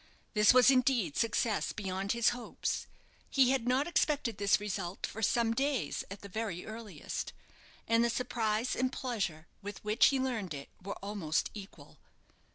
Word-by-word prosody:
This 210 Hz, -1 st, +6 dB
was 255 Hz, +1 st, +7 dB
indeed 250 Hz, -, +2 dB
success 225 Hz, -1 st, +1 dB
beyond 195 Hz, -1 st, -2 dB
his 235 Hz, -1 st, +4 dB
hopes. 245 Hz, 0 st, -3 dB, 0.4 s
He 260 Hz, -2 st, +4 dB
had 260 Hz, -3 st, 0 dB
not 260 Hz, +3 st, +3 dB
expected 290 Hz, -10 st, 0 dB
this 200 Hz, -1 st, +4 dB
result 195 Hz, -3 st, -3 dB
for 220 Hz, -, -7 dB
some 230 Hz, +1 st, +2 dB
days, 275 Hz, 0 st, 0 dB
at 200 Hz, +1 st, -8 dB
the 200 Hz, -, -8 dB
very 200 Hz, -3 st, -4 dB
earliest, 220 Hz, -2 st, -6 dB, 0.5 s
and 230 Hz, +1 st, +4 dB
the 235 Hz, -, +3 dB
surprise 230 Hz, -1 st, 0 dB
and 255 Hz, 0 st, 0 dB
pleasure 200 Hz, -13 st, -3 dB, 0.2 s
with 205 Hz, 0 st, -6 dB
which 210 Hz, +2 st, +5 dB
he 275 Hz, -, +2 dB
learned 230 Hz, -, -2 dB
it 140 Hz, 0 st, -8 dB
were 200 Hz, +2 st, -5 dB
almost 195 Hz, -6 st, -1 dB
equal. 205 Hz, -2 st, -11 dB
220 Hz, 160 wpm, -32 LUFS, 200-250 Hz, 0.5 s, was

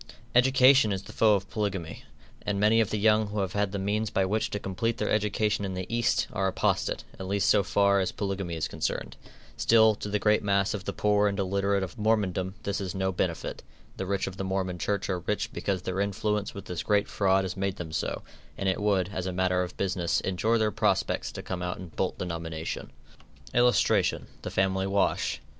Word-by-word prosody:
Education 130 Hz, -1 st, +6 dB
is 95 Hz, -1 st, -2 dB
the -, -, -11 dB
foe 110 Hz, -2 st, +4 dB
of 100 Hz, 0 st, -3 dB
polygamy, 95 Hz, -8 st, -3 dB, 0.4 s
and 100 Hz, -1 st, -2 dB
many 110 Hz, +2 st, +4 dB
of 110 Hz, -, 0 dB
the 110 Hz, -, -1 dB
young 110 Hz, 0 st, +3 dB
who 105 Hz, +1 st, -3 dB
have 95 Hz, -2 st, -2 dB
had 105 Hz, -1 st, 0 dB
the 100 Hz, -, -3 dB
means 105 Hz, +2 st, -1 dB
by 95 Hz, -1 st, +1 dB
which 105 Hz, +3 st, 0 dB
to -, -, -3 dB
complete 105 Hz, +4 st, -2 dB
their 105 Hz, -, -1 dB
education 105 Hz, -1 st, +1 dB
in 95 Hz, -2 st, -3 dB
the 95 Hz, 0 st, -3 dB
East, 120 Hz, -1 st, +2 dB
are 95 Hz, 0 st, 0 dB
apostate, 95 Hz, -, 0 dB, 0.2 s
at 95 Hz, -, -5 dB
least 100 Hz, -1 st, +1 dB
so 105 Hz, -, +5 dB
far 100 Hz, +1 st, +3 dB
as 95 Hz, -, 0 dB
polygamy 95 Hz, -4 st, -3 dB
is 80 Hz, -1 st, -2 dB
concerned. -, -, -3 dB, 0.4 s
Still, 110 Hz, -1 st, +5 dB
to 105 Hz, -, -6 dB
the 105 Hz, -, +1 dB
great 105 Hz, +1 st, +3 dB
mass 100 Hz, -1 st, +1 dB
of 100 Hz, -3 st, -5 dB
the -, -, -2 dB
poor 105 Hz, +1 st, +2 dB
and 100 Hz, -1 st, -1 dB
illiterate 100 Hz, 0 st, +1 dB
of 90 Hz, 0 st, -7 dB
Mormondom 100 Hz, -4 st, 0 dB
this 100 Hz, 0 st, -2 dB
is 95 Hz, 0 st, -4 dB
no 95 Hz, 0 st, 0 dB
benefit. 90 Hz, -2 st, -2 dB, 0.4 s
The 95 Hz, -, -4 dB
rich 100 Hz, 0 st, 0 dB
of 95 Hz, -1 st, -6 dB
the 95 Hz, -, -3 dB
Mormon 95 Hz, -2 st, -2 dB
Church 100 Hz, +1 st, -1 dB
are 95 Hz, -2 st, -1 dB
rich 100 Hz, +4 st, -2 dB
because 95 Hz, -3 st, -2 dB
their 95 Hz, +1 st, -3 dB
influence 105 Hz, +1 st, -1 dB
with 100 Hz, -1 st, -7 dB
this 90 Hz, -4 st, -4 dB
great 105 Hz, -1 st, +2 dB
fraud 95 Hz, -1 st, +2 dB
has 95 Hz, -1 st, -4 dB
made 95 Hz, 0 st, -1 dB
them 85 Hz, -5 st, -7 dB
so; 80 Hz, -, -2 dB, 0.3 s
and 95 Hz, -, -2 dB
it 95 Hz, +2 st, 0 dB
would, 100 Hz, -3 st, +2 dB
as 95 Hz, -2 st, -4 dB
a -, -, -1 dB
matter 90 Hz, 0 st, +1 dB
of 90 Hz, 0 st, -5 dB
business, 90 Hz, -3 st, 0 dB
injure 110 Hz, +5 st, +1 dB
their 110 Hz, -1 st, +1 dB
prospects -, -, 0 dB
to -, -, -7 dB
come 95 Hz, -1 st, -4 dB
out 90 Hz, 0 st, -3 dB
and 90 Hz, -3 st, -10 dB
bolt -, -, -1 dB
the -, -, -3 dB
nomination. 80 Hz, -2 st, -5 dB, 0.6 s
[Illustration: 120 Hz, 0 st, +3 dB, 0.2 s
THE -, -, -5 dB
FAMILY 95 Hz, 0 st, +1 dB
WASH. 100 Hz, 0 st, 0 dB
100 Hz, 215 wpm, -28 LUFS, 95-105 Hz, 0.6 s, Education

